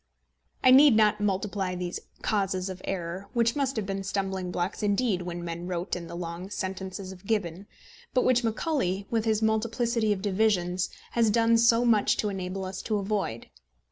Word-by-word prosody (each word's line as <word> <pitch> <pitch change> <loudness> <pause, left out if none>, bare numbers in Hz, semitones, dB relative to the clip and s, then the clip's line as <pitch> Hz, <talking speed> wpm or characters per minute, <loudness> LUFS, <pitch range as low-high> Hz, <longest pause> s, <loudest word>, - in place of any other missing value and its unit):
I 255 - +7
need 270 -1 +8
not 210 -1 +3
multiply 195 -2 -1
these 180 0 -4 0.2
causes 195 -3 0
of 185 0 -9
error, 185 +1 -4
which 235 -1 +2
must 275 -2 0
have 215 -3 -2
been 195 0 -3
stumbling 190 -2 -2
blocks 180 +2 -2
indeed 205 -2 +1
when 175 -1 -5
men 170 +1 -5
wrote 180 +1 -2
in 170 -1 -6
the - - -8
long 170 +2 -6
sentences 190 -1 -5
of 190 +1 -13
Gibbon, 200 -3 -2 0.4
but 255 - +2
which 245 -1 +3
Macaulay, 220 - -1
with 225 -1 +1
his 220 -1 +1
multiplicity 230 0 +1
of 195 -2 -1
divisions, 185 -3 +1 0.2
has 230 -2 +3
done 230 +1 +4
so 230 +1 +4
much 220 -3 +3
to 210 - 0
enable 190 0 -4
us 185 0 -5
to 215 - -1
avoid. 195 - -3
200 Hz, 175 wpm, -27 LUFS, 185-220 Hz, 0.4 s, need